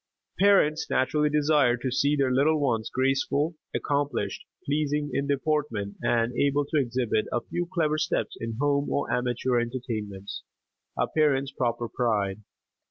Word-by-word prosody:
Parents 175 -6 +4
naturally 150 +3 +2
desire 145 -4 +3
to 125 +2 -3
see 140 +3 +2
their 135 -3 +1
little 150 +4 +3
ones 115 -6 0
graceful, 135 +4 +1 0.2
accomplished, 140 -8 -2 0.2
pleasing 145 0 0
in 140 +1 -1
deportment, 140 -8 -1
and 120 0 +1
able 140 +2 +2
to 155 - +1
exhibit 120 -4 0
a 120 - 0
few 175 +8 -3
clever 155 -4 +1
steps - - -1
in 115 -1 -4
home 145 0 +1
or - - -1
amateur 125 0 0
entertainments 115 -5 -4 0.6
a - - +2
parent's 140 -3 +1
proper 120 -3 -1
pride. 105 -5 -1
135 Hz, 140 wpm, -27 LUFS, 120-150 Hz, 0.6 s, Parents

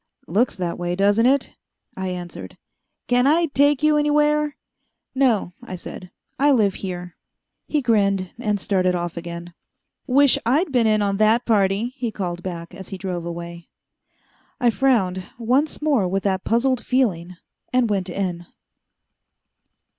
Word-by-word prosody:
"Looks 220 +9 +1
that 175 -2 -3
way, 175 0 -2
doesn't 205 +5 +3
it?" 275 0 +1 0.4
I 190 0 -4
answered. 175 - -7 0.5
"Can 245 +1 +3
I 330 +4 +4
take 285 +1 +3
you 305 0 +4
anywhere?" 295 0 +2 0.6
"No," 240 -9 +1
I 185 - -7
said, 180 +1 -9 0.3
"I 285 +2 +4
live 215 -8 +3
here." 180 -2 -6 0.5
He 300 -3 0
grinned, 200 -5 +1
and 210 -4 -1
started 185 -2 +1
off 175 -1 -3
again. 170 0 -7 0.5
"Wish 280 +1 +4
I'd 285 +8 +1
been 240 -4 +3
in 215 -1 +2
on 200 -1 0
that 220 +3 +3
party!" 210 +2 +1
he 245 -4 -2
called 180 -4 -4
back, 170 -2 -6
as 190 - -10
he 195 - -6
drove 180 -3 -4
away. 170 0 -7 0.9
I 245 -3 +3
frowned, 210 -8 +1
once 260 +7 0
more 275 -11 +2
with 195 +2 -1
that 190 -1 0
puzzled 245 +2 +1
feeling, 185 -9 0 0.4
and 250 -1 +3
went 195 -3 -1
in. 175 -2 -3
205 Hz, 145 wpm, -22 LUFS, 180-255 Hz, 0.9 s, I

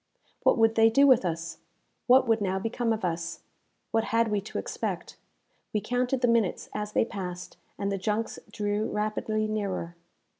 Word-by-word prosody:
What - - +4
would 225 -1 +4
they 225 0 +5
do 275 +5 +5
with 260 -6 +6
us? 165 -1 -3 0.5
What 255 0 +6
would 225 -1 +3
now 190 -1 0
become 225 +3 -1
of 220 -3 -1
us? 170 -1 -3 0.5
What 225 0 +1
had 230 0 +2
we 205 -1 +1
to 210 - -7
expect? - - -4 0.6
We 210 - +2
counted 250 +3 -1
the 245 - +4
minutes 230 -5 +1
as 210 0 -4
they - - +3
passed, 180 -4 -6 0.2
and 200 0 -1
the 195 - -2
junks 215 +4 -2
drew 210 0 -1
rapidly 215 +1 -1
nearer. 195 -5 -3
215 Hz, 175 wpm, -28 LUFS, 195-225 Hz, 0.6 s, with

